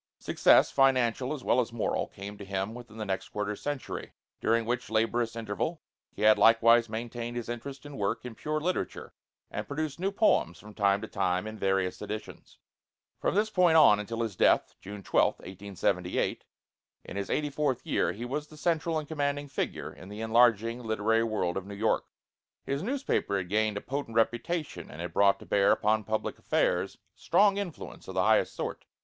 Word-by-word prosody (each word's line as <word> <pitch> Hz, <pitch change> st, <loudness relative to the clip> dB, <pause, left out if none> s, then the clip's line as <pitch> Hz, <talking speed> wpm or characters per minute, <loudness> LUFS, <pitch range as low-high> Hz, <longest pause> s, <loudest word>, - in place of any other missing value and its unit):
Success, -, -, +4 dB
financial 130 Hz, -1 st, +2 dB
as 145 Hz, -4 st, -4 dB
well 125 Hz, -, +3 dB
as 120 Hz, -1 st, 0 dB
moral, 115 Hz, -1 st, -1 dB
came 100 Hz, +1 st, -9 dB
to 100 Hz, -, -9 dB
him 95 Hz, +2 st, -3 dB
within 120 Hz, -2 st, -11 dB
the 110 Hz, -, -4 dB
next 95 Hz, -1 st, -3 dB
quarter 105 Hz, 0 st, -3 dB
century, 145 Hz, +4 st, -5 dB, 0.3 s
during 115 Hz, 0 st, +1 dB
which 125 Hz, +2 st, -2 dB
laborious 115 Hz, +1 st, 0 dB
interval 115 Hz, +9 st, -3 dB, 0.3 s
he -, -, -6 dB
had 110 Hz, 0 st, +6 dB
likewise 115 Hz, 0 st, +6 dB
maintained 120 Hz, +1 st, -5 dB
his 120 Hz, -, -4 dB
interest 130 Hz, +4 st, -6 dB
and 145 Hz, -1 st, -8 dB
work 110 Hz, +4 st, -1 dB
in 125 Hz, -, -6 dB
pure 155 Hz, +6 st, -2 dB
literature 180 Hz, +4 st, -3 dB, 0.4 s
and -, -, -4 dB
produced 150 Hz, +1 st, -3 dB
new 195 Hz, +2 st, 0 dB
poems 200 Hz, -, +2 dB
from 105 Hz, 0 st, -13 dB
time 100 Hz, -1 st, +2 dB
to 110 Hz, -, -5 dB
time 95 Hz, -1 st, 0 dB
in 110 Hz, 0 st, -6 dB
various 95 Hz, -3 st, 0 dB
editions. 110 Hz, 0 st, -7 dB, 0.6 s
From -, -, 0 dB
this 215 Hz, +1 st, +2 dB
point 180 Hz, -5 st, +4 dB
on 105 Hz, -10 st, +7 dB
until 115 Hz, +3 st, -4 dB
his 110 Hz, -4 st, -4 dB
death, -, -, +3 dB
June 100 Hz, 0 st, -8 dB
12th, -, -, +2 dB
1878, 95 Hz, -1 st, -2 dB, 0.6 s
in -, -, -9 dB
his 100 Hz, 0 st, -3 dB
eighty 150 Hz, -1 st, 0 dB
fourth 140 Hz, -3 st, -1 dB
year, -, -, +1 dB
he 110 Hz, +7 st, -6 dB
was 145 Hz, +4 st, -3 dB
the 155 Hz, -, -14 dB
central 165 Hz, 0 st, 0 dB
and 155 Hz, -1 st, -4 dB
commanding 145 Hz, -1 st, -2 dB
figure 135 Hz, -, -4 dB
in 90 Hz, -, -12 dB
the 105 Hz, +2 st, -7 dB
enlarging 115 Hz, 0 st, +3 dB
literary 110 Hz, 0 st, +1 dB
world 100 Hz, -6 st, -1 dB
of 95 Hz, 0 st, -5 dB
New 100 Hz, -, -7 dB
York. 110 Hz, +2 st, +1 dB, 0.6 s
His 140 Hz, +1 st, -2 dB
newspaper 255 Hz, -, -1 dB
had 90 Hz, -2 st, -4 dB
gained 105 Hz, 0 st, +1 dB
a -, -, -4 dB
potent 135 Hz, -4 st, -4 dB
reputation, 120 Hz, -, -1 dB
and 75 Hz, -, -10 dB
it 85 Hz, +1 st, -5 dB
brought 100 Hz, -1 st, +4 dB
to -, -, -10 dB
bear 100 Hz, -1 st, +3 dB
upon 110 Hz, 0 st, +2 dB
public 110 Hz, +1 st, -2 dB
affairs -, -, 0 dB
a -, -, -31 dB, 0.2 s
strong 200 Hz, +3 st, +4 dB
influence 195 Hz, -6 st, -6 dB
of -, -, -7 dB
the -, -, +2 dB
highest -, -, +3 dB
sort. -, -, -5 dB
115 Hz, 190 wpm, -29 LUFS, 105-140 Hz, 0.6 s, on